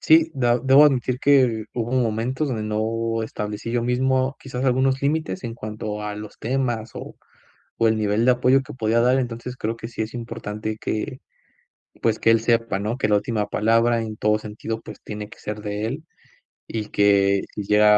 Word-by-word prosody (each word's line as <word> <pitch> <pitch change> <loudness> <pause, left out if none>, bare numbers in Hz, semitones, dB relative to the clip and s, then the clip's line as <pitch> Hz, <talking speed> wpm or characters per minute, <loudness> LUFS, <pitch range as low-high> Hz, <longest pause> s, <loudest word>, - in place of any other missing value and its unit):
Sí. 160 +1 +5
Dab 120 -2 +2
debo 135 +3 +7
admitir 130 -3 +2
que, 125 -6 +3
hubo 120 0 -3
momentos, 125 +4 0
donde 110 -4 -2
no 115 +1 -1
establecí, 105 +1 -5
yo 120 -1 0
mismo, 130 +2 +1
quizás 130 -1 -5
algunos 130 +1 +2
límites, 155 +6 -1
en 115 - -4
cuanto 105 -2 -5
a 105 0 -4
los 105 0 -9
temas, 120 -3 -1
o - - -8 0.6
o 115 - +3
el 110 0 +2
nivel 105 +2 +1
de 125 - +6
apoyo, 125 +2 +4
que 130 - -10
podía 115 -1 +1
dar. 125 +2 +4
Entonces, 125 0 -4
creo 110 +2 -2
que, 115 0 -7
sí 115 -2 -3
es 110 - -8
importante 110 -2 -5
que, 125 +4 -3 0.8
pues 110 -1 +1
que 115 - +4
él 115 -1 +4
sepa, 115 -3 +1
¿no? 105 +5 -2
Que - - +1
la 105 - +3
última 105 0 0
palabra, 115 +2 +2
en 110 -1 -5
todo 105 0 +2
sentido, 110 +1 -5
pues - - -11
tiene 105 0 -7
que - - -14
ser 105 0 -5
de 105 +1 -3
él. 140 +8 -4 0.6
Y 110 -2 -4
que, 100 -1 +3
si 105 - -4
llega 105 +1 +5
115 Hz, 195 wpm, -23 LUFS, 105-125 Hz, 0.8 s, debo